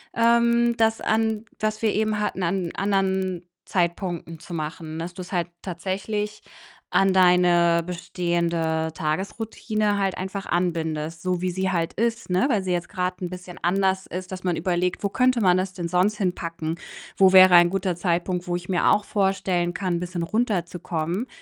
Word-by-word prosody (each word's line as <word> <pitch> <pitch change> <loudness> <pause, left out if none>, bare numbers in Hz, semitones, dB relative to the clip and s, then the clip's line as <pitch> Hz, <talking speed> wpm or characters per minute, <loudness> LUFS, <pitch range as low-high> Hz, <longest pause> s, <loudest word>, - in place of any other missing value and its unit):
ähm, 235 0 +3
das 225 0 +2
an 220 0 0
was 215 0 -1
wir 215 - +2
eben 215 0 0
hatten, 210 -2 -2
an 175 0 -1
anderen 190 -2 0 0.2
Zeitpunkten 170 -2 -2
zu 175 - -10
machen, 155 0 -5
dass 170 +2 -5
du's 185 +1 -8
halt 175 -1 0
tatsächlich 200 +4 -3 0.5
an 195 0 +3
deine 175 -2 +4
bestehende 170 -2 -1
Tagesroutine 205 +6 -2
halt 195 -2 0
einfach 190 +1 -5
anbindest, 165 -2 -2
so 180 0 -1
wie 185 0 0
sie 190 +1 -1
halt 170 -3 0
ist, 230 0 -1
ne, 185 +8 +2
weil 210 -7 +1
sie 185 - -2
jetzt 175 -1 -1
grad 180 -2 -3
'n 180 - -3
bisschen 180 0 -9
anders 190 +1 +1
ist, 185 +1 -6
dass 185 0 -7
man 175 -2 +1
überlegt: 180 +2 -1
„Wo 200 - +1
könnte 255 +1 +2
man 180 -3 +4
das 185 0 -2
denn 175 -2 -4
sonst 185 +4 +2
hinpacken? 170 -4 -3 0.4
Wo 190 -1 +6
wäre 185 -1 +9
ein 175 0 +7
guter 190 -2 -1
Zeitpunkt, 175 0 -1
wo 175 - -1
ich 175 +1 -6
mir 180 -2 +2
auch 210 - +3
vorstellen 190 -4 0
kann, 180 0 -1
'n - - -3
bisschen 175 -1 -4
runterzukommen?” 180 -1 -2
185 Hz, 170 wpm, -24 LUFS, 175-200 Hz, 0.5 s, wäre